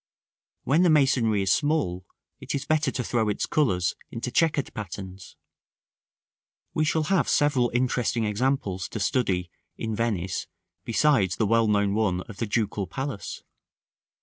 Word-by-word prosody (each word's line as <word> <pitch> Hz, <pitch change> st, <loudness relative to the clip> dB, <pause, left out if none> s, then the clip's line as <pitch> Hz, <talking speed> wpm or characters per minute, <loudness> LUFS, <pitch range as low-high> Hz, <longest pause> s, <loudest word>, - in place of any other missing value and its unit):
When 150 Hz, +5 st, +3 dB
the 180 Hz, -, +5 dB
masonry 130 Hz, -9 st, +3 dB
is 95 Hz, -, +3 dB
small, 140 Hz, -, 0 dB, 0.3 s
it -, -, -4 dB
is 140 Hz, 0 st, -3 dB
better 155 Hz, -1 st, +2 dB
to 130 Hz, -1 st, -3 dB
throw 115 Hz, -2 st, 0 dB
its 105 Hz, -, -1 dB
colors 95 Hz, -, +1 dB
into 120 Hz, +2 st, -5 dB
chequered 150 Hz, -1 st, +1 dB
patterns. 95 Hz, -3 st, -8 dB, 1.4 s
We 155 Hz, -, +1 dB
shall 155 Hz, +1 st, +1 dB
have 190 Hz, +3 st, +1 dB
several 140 Hz, -5 st, +3 dB
interesting 120 Hz, -2 st, 0 dB
examples 105 Hz, -4 st, -1 dB
to 110 Hz, -, -5 dB
study 95 Hz, -6 st, 0 dB, 0.3 s
in 110 Hz, -1 st, -3 dB
Venice 100 Hz, -6 st, -2 dB, 0.4 s
besides 115 Hz, -, +2 dB
the 110 Hz, -, +1 dB
well 115 Hz, +1 st, +3 dB
known 100 Hz, -1 st, +2 dB
one 100 Hz, -4 st, +1 dB
of 105 Hz, +1 st, -11 dB
the 115 Hz, -, -2 dB
Ducal 105 Hz, -2 st, -1 dB
Palace. 135 Hz, -, -5 dB
115 Hz, 145 wpm, -26 LUFS, 100-140 Hz, 1.4 s, the